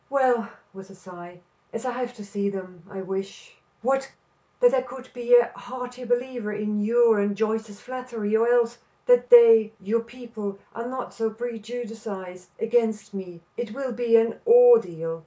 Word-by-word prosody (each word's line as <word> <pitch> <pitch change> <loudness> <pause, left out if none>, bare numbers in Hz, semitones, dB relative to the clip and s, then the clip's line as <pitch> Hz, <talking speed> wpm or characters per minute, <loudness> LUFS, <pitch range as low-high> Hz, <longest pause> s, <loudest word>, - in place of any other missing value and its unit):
Well," 255 -4 +2 0.2
with 195 0 -12
a 195 - -14
sigh, 175 -1 -13 0.3
"as 230 +2 -6
I 250 - -1
have 245 0 -5
to 210 -3 -10
see 200 0 -2
them, 185 -3 -8
I 195 -2 -7
wish 195 +1 -7
" - - -40
"What?" 270 +2 0 0.5
"That - - +5
I 255 - +3
could 255 0 -11
be 245 0 +3
a 240 -1 +4
heartier 250 0 -8
believer 245 -2 -2
in 210 0 -2
your 230 0 +3
and 200 0 -1
Joyce's 220 -1 -2
flattery, 245 -4 -4
or 225 +1 +3
else, 240 0 +2 0.3
that 245 0 +4
they, 225 -2 +7
your 215 +4 -1
people, 230 -4 -8 0.2
were 235 +1 -5
not 255 0 -6
so 225 -1 -1
prejudiced 225 0 -7 0.5
against 220 -3 0
me. 180 -3 -8
It 235 -2 -6
will 270 -2 -4
be 235 -1 +1
an 230 0 +2
ordeal." 310 - +5
230 Hz, 170 wpm, -24 LUFS, 205-245 Hz, 0.5 s, they